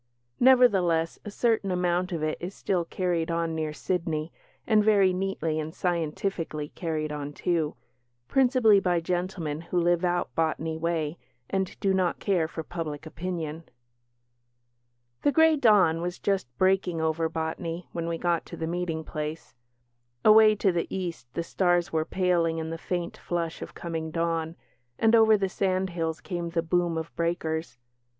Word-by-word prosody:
Nevertheless, 195 Hz, -11 st, +4 dB
a 210 Hz, -, -6 dB
certain 220 Hz, -1 st, +1 dB
amount 180 Hz, 0 st, 0 dB
of 165 Hz, -3 st, -2 dB
it 155 Hz, 0 st, 0 dB
is 180 Hz, +3 st, -5 dB
still 180 Hz, -3 st, -1 dB
carried 175 Hz, -2 st, -1 dB
on 165 Hz, -1 st, -1 dB
near 155 Hz, -1 st, -2 dB
Sydney, 160 Hz, -1 st, -2 dB, 0.3 s
and 215 Hz, -2 st, +4 dB
very 200 Hz, -3 st, +4 dB
neatly 180 Hz, -4 st, -1 dB
and 155 Hz, +1 st, -5 dB
scientifically 165 Hz, -2 st, -2 dB
carried 155 Hz, -3 st, -3 dB
on, 145 Hz, -1 st, -5 dB
too 165 Hz, -2 st, -1 dB, 0.5 s
principally 250 Hz, -6 st, +4 dB
by 180 Hz, -3 st, +1 dB
gentlemen 175 Hz, -3 st, -2 dB
who 175 Hz, +1 st, -1 dB
live 175 Hz, 0 st, +2 dB
out 175 Hz, 0 st, 0 dB
Botany 160 Hz, 0 st, -1 dB
way 160 Hz, -1 st, -2 dB, 0.3 s
and 190 Hz, -1 st, -2 dB
do 195 Hz, -2 st, +2 dB
not 185 Hz, -2 st, +1 dB
care 180 Hz, -6 st, +1 dB
for 160 Hz, 0 st, -6 dB
public 160 Hz, -3 st, -5 dB
opinion. 165 Hz, -1 st, -5 dB, 1.6 s
The 290 Hz, -, +3 dB
grey 320 Hz, +1 st, +5 dB
dawn 205 Hz, -, +4 dB
was 175 Hz, +1 st, -3 dB
just 195 Hz, -7 st, 0 dB
breaking 185 Hz, -2 st, +2 dB
over 160 Hz, 0 st, 0 dB
Botany 165 Hz, +2 st, -4 dB
when 170 Hz, -1 st, -3 dB
we 170 Hz, 0 st, -2 dB
got 170 Hz, -1 st, 0 dB
to -, -, -8 dB
the 160 Hz, -, -3 dB
meeting 165 Hz, -1 st, -2 dB
place. 155 Hz, +1 st, -5 dB, 0.7 s
Away 215 Hz, 0 st, +8 dB
to 200 Hz, -2 st, +2 dB
the 170 Hz, -1 st, -1 dB
East 170 Hz, -10 st, -5 dB
the 170 Hz, -, -1 dB
stars 175 Hz, -1 st, +1 dB
were 160 Hz, -1 st, +1 dB
paling 170 Hz, -3 st, +1 dB
in 160 Hz, 0 st, -3 dB
the 165 Hz, -, -4 dB
faint 175 Hz, -1 st, -3 dB
flush 170 Hz, -2 st, -3 dB
of -, -, -8 dB
coming 165 Hz, -2 st, -4 dB
dawn, 165 Hz, 0 st, -1 dB, 0.4 s
and 225 Hz, 0 st, +3 dB
over 220 Hz, -1 st, +6 dB
the 195 Hz, -1 st, 0 dB
sandhills 185 Hz, -4 st, -1 dB
came 175 Hz, -3 st, -4 dB
the 165 Hz, -1 st, -1 dB
boom 170 Hz, 0 st, +1 dB
of 160 Hz, 0 st, -5 dB
breakers. 165 Hz, -4 st, -2 dB
170 Hz, 155 wpm, -27 LUFS, 160-185 Hz, 1.6 s, Away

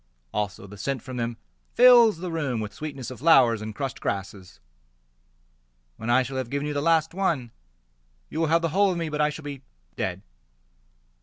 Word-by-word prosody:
Also 105 Hz, -1 st, -3 dB
the 100 Hz, 0 st, -12 dB
scent 135 Hz, +3 st, -3 dB
from 130 Hz, -2 st, -7 dB
them 115 Hz, -1 st, -3 dB, 0.4 s
fills 240 Hz, -5 st, +7 dB
the 175 Hz, +1 st, -5 dB
room 145 Hz, -8 st, -2 dB
With 105 Hz, -1 st, -5 dB
sweetness 135 Hz, -3 st, -6 dB
of 130 Hz, -, -9 dB
flowers 130 Hz, -7 st, +5 dB
and 110 Hz, 0 st, -6 dB
crushed 135 Hz, 0 st, -4 dB
grasses. 95 Hz, -1 st, -5 dB, 1.4 s
When 115 Hz, -, -5 dB
I 130 Hz, +2 st, +4 dB
shall 130 Hz, +2 st, -5 dB
have 130 Hz, -3 st, -3 dB
given 140 Hz, +2 st, -2 dB
you 150 Hz, -, -2 dB
the 145 Hz, -, -1 dB
last 160 Hz, 0 st, +2 dB
one, 165 Hz, -11 st, -1 dB, 0.8 s
You 160 Hz, -, -5 dB
will 165 Hz, -, +2 dB
have 165 Hz, +2 st, +2 dB
the 165 Hz, -, +1 dB
whole 195 Hz, +4 st, +3 dB
of 175 Hz, -, -3 dB
me, 165 Hz, -2 st, -2 dB
But 150 Hz, 0 st, -2 dB
I 150 Hz, -, +3 dB
shall 150 Hz, +1 st, -8 dB
be 140 Hz, -2 st, -6 dB, 0.3 s
dead. 95 Hz, +5 st, -3 dB
140 Hz, 190 wpm, -25 LUFS, 115-165 Hz, 1.4 s, fills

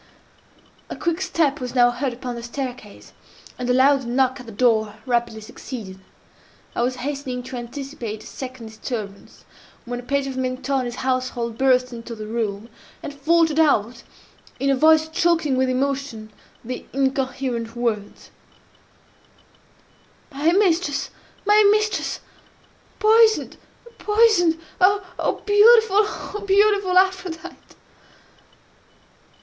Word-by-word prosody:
A -, -, -5 dB
quick 340 Hz, +1 st, -2 dB
step 325 Hz, -6 st, 0 dB
was 250 Hz, 0 st, -6 dB
now 245 Hz, -1 st, +5 dB
heard 255 Hz, +2 st, -2 dB
upon 245 Hz, +1 st, -6 dB
the 235 Hz, -, -7 dB
staircase, 245 Hz, -3 st, -7 dB, 0.5 s
and 250 Hz, 0 st, -3 dB
a -, -, +4 dB
loud 270 Hz, +1 st, +4 dB
knock 260 Hz, +2 st, +1 dB
at 250 Hz, -, -11 dB
the -, -, -8 dB
door 220 Hz, -2 st, +1 dB
rapidly 235 Hz, -3 st, -1 dB
succeeded. 215 Hz, -3 st, -9 dB, 0.8 s
I -, -, 0 dB
was 250 Hz, +1 st, 0 dB
hastening 270 Hz, -3 st, -4 dB
to 255 Hz, -, -8 dB
anticipate 240 Hz, -3 st, -6 dB
a -, -, -15 dB
second 255 Hz, -3 st, -8 dB
disturbance, 215 Hz, -2 st, -7 dB, 0.4 s
when 245 Hz, 0 st, -4 dB
a -, -, -9 dB
page 280 Hz, +2 st, -1 dB
of 265 Hz, -1 st, -5 dB
Mentoni's 255 Hz, -1 st, -2 dB
household 255 Hz, -3 st, -2 dB
burst 255 Hz, 0 st, +2 dB
into 230 Hz, 0 st, -8 dB
the 215 Hz, -1 st, -7 dB
room, 215 Hz, -1 st, -3 dB, 0.4 s
and 290 Hz, -, -6 dB
faltered 320 Hz, +2 st, +2 dB
out, 240 Hz, -6 st, +2 dB, 0.6 s
in 275 Hz, 0 st, +1 dB
a -, -, +3 dB
voice 315 Hz, +3 st, +4 dB
choking 330 Hz, -4 st, +1 dB
with 260 Hz, 0 st, +1 dB
emotion, 265 Hz, -4 st, -2 dB, 0.3 s
the 250 Hz, +1 st, -5 dB
incoherent 265 Hz, -3 st, -2 dB
words, 225 Hz, -4 st, -3 dB, 2.0 s
"My 295 Hz, +4 st, +1 dB
mistress!—my 390 Hz, +3 st, +1 dB
mistress!—Poisoned!—poisoned! 430 Hz, -2 st, 0 dB, 0.2 s
Oh, 375 Hz, -1 st, +1 dB
beautiful—oh, 420 Hz, -1 st, +4 dB
beautiful 400 Hz, -2 st, +3 dB
Aphrodite!" 370 Hz, -3 st, 0 dB
265 Hz, 110 wpm, -22 LUFS, 240-335 Hz, 2.0 s, now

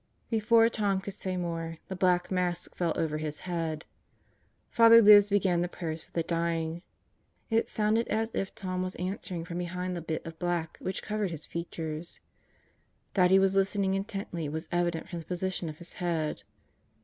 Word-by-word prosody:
Before 225 Hz, +1 st, +5 dB
Tom 205 Hz, -4 st, 0 dB
could 195 Hz, +1 st, -6 dB
say 185 Hz, -2 st, -3 dB
more, 165 Hz, -2 st, -3 dB
the 190 Hz, -, -4 dB
black 180 Hz, -1 st, +2 dB
mask 180 Hz, -2 st, -1 dB
fell 170 Hz, -2 st, 0 dB
over 155 Hz, -1 st, -1 dB
his 150 Hz, -1 st, -4 dB
head. 165 Hz, -3 st, -3 dB, 0.9 s
Father 230 Hz, 0 st, +8 dB
Libs 205 Hz, -2 st, +8 dB
began 190 Hz, -4 st, +2 dB
the 175 Hz, -, 0 dB
prayers 165 Hz, -2 st, -5 dB
for -, -, -21 dB
the 165 Hz, -, 0 dB
dying. 165 Hz, 0 st, -1 dB, 0.7 s
It 225 Hz, +1 st, +2 dB
sounded 220 Hz, +2 st, +1 dB
as 220 Hz, +1 st, -1 dB
if 195 Hz, -, -3 dB
Tom 185 Hz, -1 st, -3 dB
was 185 Hz, 0 st, -3 dB
answering 180 Hz, -2 st, -4 dB
from 175 Hz, 0 st, -4 dB
behind 180 Hz, +1 st, -3 dB
the 170 Hz, -, -4 dB
bit 160 Hz, -1 st, -4 dB
of 165 Hz, -1 st, -8 dB
black 175 Hz, -2 st, -2 dB
which 185 Hz, -, -3 dB
covered 210 Hz, -2 st, -1 dB
his 160 Hz, -3 st, -7 dB
features. 165 Hz, -1 st, -5 dB, 0.9 s
That 180 Hz, -2 st, +4 dB
he 190 Hz, -, +7 dB
was 195 Hz, 0 st, +3 dB
listening 195 Hz, 0 st, +2 dB
intently 195 Hz, -5 st, -3 dB
was 160 Hz, +2 st, -4 dB
evident 175 Hz, -1 st, 0 dB
from 175 Hz, -2 st, -4 dB
the 165 Hz, -, -10 dB
position 180 Hz, 0 st, -2 dB
of 150 Hz, -, -8 dB
his 170 Hz, +1 st, -10 dB
head. 165 Hz, -4 st, -2 dB
180 Hz, 175 wpm, -29 LUFS, 165-195 Hz, 0.9 s, Father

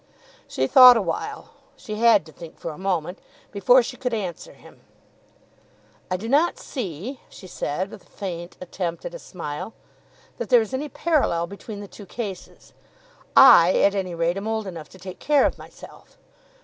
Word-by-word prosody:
She 130 Hz, -, -1 dB
thought 250 Hz, -, +9 dB
awhile, 225 Hz, -, -4 dB, 0.3 s
she 215 Hz, -, -8 dB
had 225 Hz, -6 st, +4 dB
to 160 Hz, -, -14 dB
think 160 Hz, +2 st, -12 dB
for 165 Hz, -, -6 dB
a 150 Hz, -, -11 dB
moment, 180 Hz, -2 st, -2 dB, 0.3 s
before 240 Hz, +5 st, +4 dB
she 250 Hz, +2 st, -7 dB
could 250 Hz, -3 st, -2 dB
answer 185 Hz, -6 st, -6 dB
him. -, -, -18 dB, 1.3 s
"I 185 Hz, -, -1 dB
do 215 Hz, +5 st, -7 dB
not 295 Hz, +7 st, +2 dB
see," 235 Hz, -, -6 dB
she -, -, -13 dB
said, 185 Hz, +1 st, -4 dB
with -, -, -11 dB
a -, -, -26 dB
faint 175 Hz, -3 st, -7 dB
attempt 175 Hz, -1 st, -5 dB
at -, -, -6 dB
a -, -, -8 dB
smile, 165 Hz, -, -7 dB, 0.6 s
"that -, -, -4 dB
there 245 Hz, -2 st, +6 dB
is 220 Hz, +2 st, -4 dB
any 290 Hz, +3 st, -3 dB
parallel 275 Hz, -, 0 dB
between 200 Hz, +2 st, -9 dB
the 205 Hz, -, -9 dB
two 200 Hz, 0 st, -13 dB
cases. 200 Hz, -3 st, -8 dB, 0.6 s
I, 180 Hz, -9 st, +8 dB
at 200 Hz, -, +4 dB
any 185 Hz, -3 st, -3 dB
rate, 170 Hz, +2 st, 0 dB
am 200 Hz, +2 st, -5 dB
old 220 Hz, -1 st, -2 dB
enough 170 Hz, -5 st, -8 dB
to -, -, -15 dB
take 185 Hz, 0 st, -10 dB
care 290 Hz, -1 st, +3 dB
of -, -, -1 dB
myself. -, -, -15 dB
195 Hz, 175 wpm, -23 LUFS, 175-240 Hz, 1.3 s, thought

